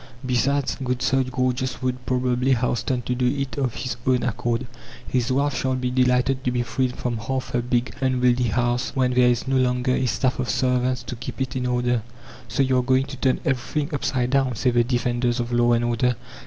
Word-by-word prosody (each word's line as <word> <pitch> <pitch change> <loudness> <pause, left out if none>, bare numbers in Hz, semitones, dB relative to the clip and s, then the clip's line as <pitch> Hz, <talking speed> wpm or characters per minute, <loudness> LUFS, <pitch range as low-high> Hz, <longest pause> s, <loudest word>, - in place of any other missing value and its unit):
Besides, 135 +3 +1
good 125 -1 -1
Sir 135 0 +3
Gorgeous 130 0 -1
would 125 0 -2
probably 125 +1 +1
hasten 125 +1 -1
to 125 - -1
do 125 0 +1
it 135 0 -2
of 130 -4 -1
his 130 - -4
own 130 -1 +3
accord; 120 +1 -1 0.4
his 125 -1 0
wife 140 +1 0
will 130 -1 +1
be 125 -1 -2
delighted 125 +1 +2
to - - +1
be 125 -1 0
freed 125 +1 -1
from 120 -2 -2
half 130 +4 -3
her 120 - +1
big, 120 0 -1
unwieldy 125 -1 +2
house 120 +2 0
when 130 -1 +2
there 125 0 +5
is 120 +1 0
no 135 0 +2
longer 125 0 +1
a 130 - +1
staff 130 +2 0
of 125 - -2
servants 125 0 +1
to 125 - -6
keep 120 +3 -7
it 130 0 -2
in 125 -1 -1
order. 125 -1 +1 0.5
"So 120 +4 +1
you 130 -1 +2
are - - +3
going 130 +1 +2
to 135 -1 -8
turn 130 0 +1
everything 140 +4 -1
upside 130 -3 -1
down," 135 -3 +2
say 125 +3 +1
the 120 0 +3
defenders 120 0 0
of 120 0 -2
law 120 0 +4
and 120 0 +2
order. 120 +1 +1
125 Hz, 210 wpm, -23 LUFS, 120-130 Hz, 0.5 s, there